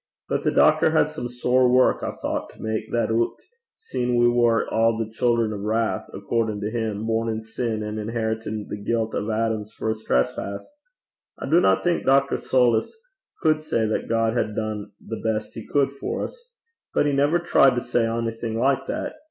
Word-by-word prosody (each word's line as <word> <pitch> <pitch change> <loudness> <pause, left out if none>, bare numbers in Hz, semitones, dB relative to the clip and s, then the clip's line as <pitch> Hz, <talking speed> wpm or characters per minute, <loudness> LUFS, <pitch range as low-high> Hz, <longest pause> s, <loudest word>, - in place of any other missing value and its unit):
But - - -1
the - - +1
doctor - - +4
had - - +2
some 120 - -5
sair 125 +1 +2
wark, 125 +1 +4
I - - -4
thoucht, - - -3
to - - -21
mak 110 0 -2
that 120 -1 0
oot, 115 +1 +1 0.4
seein' 125 - -2
we 120 0 +5
war 120 -1 +3
a' 115 0 +1
the 115 -1 -2
children 115 -2 +1
o' - - -4
wrath, 110 +2 -1
accordin' 110 -3 -2
to 105 +1 -2
him, 110 -2 -2
born 115 0 0
in 110 0 -3
sin, 110 -1 -3
and 105 0 -4
inheritin' 110 -1 -3
the - - -5
guilt 115 +1 -1
o' 105 - -2
Adam's 110 -1 -1
first 110 0 -4
trespass. 65 +11 -1 0.7
I - - -6
dinna 135 - +4
think 175 -1 +1
Dr. 135 +1 +4
Soulis 120 -3 +2 0.5
cud 155 -1 +3
say 115 -7 0
that 110 - -2
God 115 0 +1
had 105 -3 -1
dune 110 -2 -3
the 115 - -7
best 110 -1 -2
he 110 - -9
cud 140 -2 +2
for 140 - -3
's. 485 0 -18 0.5
But - - +3
he 145 - +1
never 145 +4 +3
tried 135 -6 +4
to 125 - 0
say 120 -2 +1
onything 115 0 -3
like 135 +2 +1
that. - - -4
115 Hz, 190 wpm, -24 LUFS, 110-125 Hz, 0.7 s, we